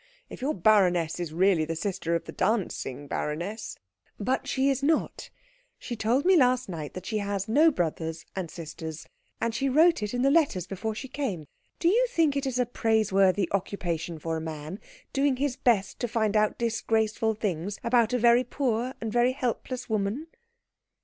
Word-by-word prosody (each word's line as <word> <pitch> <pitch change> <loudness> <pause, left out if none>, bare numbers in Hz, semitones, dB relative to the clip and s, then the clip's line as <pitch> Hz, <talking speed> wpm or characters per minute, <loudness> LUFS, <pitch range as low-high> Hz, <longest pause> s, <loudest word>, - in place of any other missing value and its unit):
If - - -9
your 285 +4 0
baroness 180 -4 +3
is 175 -3 -3
really 180 0 +3
the 165 +1 -3
sister 175 -1 -2
of 170 - -2
the - - -7
dancing 185 - -1
baroness 175 +11 -4 0.2
" 95 - -40
"But 265 +1 0
she 270 -1 +1
is 275 - -1
not. 310 +3 0 0.5
She 240 - -6
told 235 +6 +1
me 375 +1 +6
last 255 -4 +3
night 160 -6 -6
that 185 - -7
she 215 -2 -1
has 200 -1 -2
no 300 +9 +5
brothers 160 - -3
and 185 -4 -3
sisters. 160 -1 -7 0.3
And 230 0 -1
she 270 +4 0
wrote 320 +4 +4
it 210 +3 -3
in 245 - 0
the 275 - +4
letters 280 - +2
before 200 +4 -4
she 265 - -6
came. 245 - -3 0.3
Do 335 - 0
you 475 +7 +4
think 325 - +2
it 280 -1 -1
is 255 -2 -2
a 250 - +2
praiseworthy 205 -5 +2
occupation 175 -4 -2
for 160 +1 -3
a - - -4
man, 155 +3 -6 0.3
doing 275 -1 +2
his 270 0 -1
best 220 -7 +1
to 245 - -1
find 220 -2 0
out 215 0 +2
disgraceful 225 -1 0
things 200 -2 -3
about 235 -1 +3
a 250 - +2
very 240 +1 +5
poor 250 -1 -1
and 220 -1 -4
very 240 +1 +3
helpless 255 0 -3
woman?" 215 +6 -1
220 Hz, 185 wpm, -27 LUFS, 180-255 Hz, 0.5 s, me